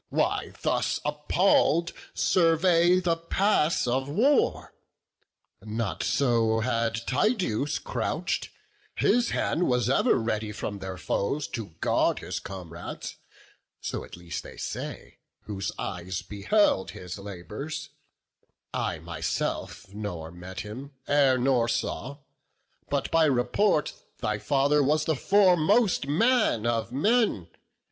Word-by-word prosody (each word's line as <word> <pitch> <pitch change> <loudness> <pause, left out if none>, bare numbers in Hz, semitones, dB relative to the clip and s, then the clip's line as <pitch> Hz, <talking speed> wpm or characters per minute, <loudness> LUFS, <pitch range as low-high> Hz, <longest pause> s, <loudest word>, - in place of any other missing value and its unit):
why - - 0
thus - - +1
appall'd 165 +2 +2 0.2
survey 175 +1 +4
The 170 -2 +1
pass 170 0 +1
of 130 +3 0
war? 255 - +2 0.9
not 110 +1 -3
so 115 -4 +2
had 115 -1 0
Tydeus 145 - +1
crouch'd; - - -2 0.5
His 240 -1 +3
hand 175 - 0
was 125 -1 +2
ever - - +4
ready 110 -1 -1
from 105 -1 -5
their 95 -1 -6
foes 140 +11 -1
To 105 -9 -6
guard - - +2
his - - -4
comrades; 90 -3 -7 0.6
so, - - -4
at - - -11
least, 85 -1 -5
they - - -12
say - - -6 0.2
Whose 100 -2 -4
eyes 90 0 -4
beheld 105 - +1
his 90 +2 -8
labours; 105 - -6 0.8
I 85 - -1
myself 80 0 -3
Nor 90 -6 -5
met 90 +2 -7
him 130 +7 -8
e'er, 140 -3 +4
nor 125 -2 +2
saw; 135 +3 -2 0.7
but, - - -1
by 165 -1 +5
report, 150 +7 +2 0.2
Thy 105 0 -2
father 140 +6 +2
was 150 +2 +2
the 160 - +1
foremost 190 - +3
man 215 - +2
of 115 -1 0
men. 175 - +1
130 Hz, 115 wpm, -27 LUFS, 105-165 Hz, 0.9 s, by